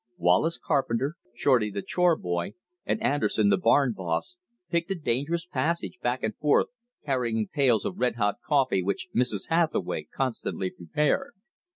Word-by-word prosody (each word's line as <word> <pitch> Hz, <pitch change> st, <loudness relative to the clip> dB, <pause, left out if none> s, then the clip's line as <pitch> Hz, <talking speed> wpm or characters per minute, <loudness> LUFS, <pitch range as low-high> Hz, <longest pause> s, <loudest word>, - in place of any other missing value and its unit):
Wallace 90 Hz, -, +3 dB
Carpenter, 140 Hz, 0 st, 0 dB, 0.2 s
Shorty, 120 Hz, -4 st, +3 dB
the 100 Hz, -1 st, -4 dB
chore 180 Hz, -2 st, +3 dB
boy, 85 Hz, -, -3 dB, 0.3 s
and -, -, 0 dB
Anderson, 110 Hz, -6 st, +2 dB
the -, -, +4 dB
barn 140 Hz, -8 st, +3 dB
boss, 95 Hz, -, -3 dB, 0.3 s
picked 170 Hz, +1 st, -1 dB
a 195 Hz, -, 0 dB
dangerous 160 Hz, +2 st, -1 dB
passage 165 Hz, -3 st, -2 dB
back 120 Hz, +1 st, -1 dB
and 110 Hz, -1 st, -1 dB
forth 150 Hz, -1 st, +3 dB, 0.4 s
carrying 120 Hz, -6 st, 0 dB
pails 130 Hz, -7 st, +2 dB
of -, -, -4 dB
red 125 Hz, -2 st, +1 dB
hot 105 Hz, -3 st, 0 dB
coffee 135 Hz, -10 st, +2 dB
which 95 Hz, +2 st, -2 dB
Mrs. 115 Hz, -5 st, 0 dB
Hathaway 165 Hz, -1 st, 0 dB
constantly 115 Hz, -7 st, -2 dB
prepared. 150 Hz, -, -1 dB
130 Hz, 150 wpm, -27 LUFS, 105-155 Hz, 0.4 s, the